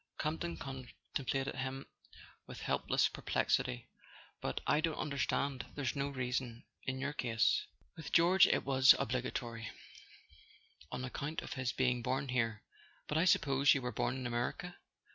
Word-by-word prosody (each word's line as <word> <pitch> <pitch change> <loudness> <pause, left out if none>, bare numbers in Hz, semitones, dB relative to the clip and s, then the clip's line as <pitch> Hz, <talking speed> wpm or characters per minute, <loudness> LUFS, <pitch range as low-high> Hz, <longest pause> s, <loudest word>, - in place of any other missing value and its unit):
Campton 165 +2 -2
contemplated 130 - -4
him 135 +1 -3 0.6
with - - -8
helpless - - +2
perplex¬ - - +1
ity. - - -5 0.5
"But - - -2
I 150 - +3
don't 160 -1 0
understand—there's 140 -2 -1
no 140 0 0
reason, 125 -3 -3 0.2
in 130 0 -3
your 140 +2 -2
case. 115 -5 +1 0.3
With 160 - -8
George 175 +2 +6
it - - +2
was 130 -1 +7
obligatory—on 115 -8 -6
ac¬ 125 - -5
count 150 +3 -3
of - - -5
his 130 -2 -1
being 125 -2 +1
born 130 +3 -1
here. 115 -3 0 0.4
But 150 - +1
I 170 - +3
suppose 140 -5 +4
you 135 - -2
were 125 - -2
born 120 - -1
in 130 -1 -5
America 120 +9 -2
130 Hz, 145 wpm, -35 LUFS, 120-140 Hz, 0.6 s, was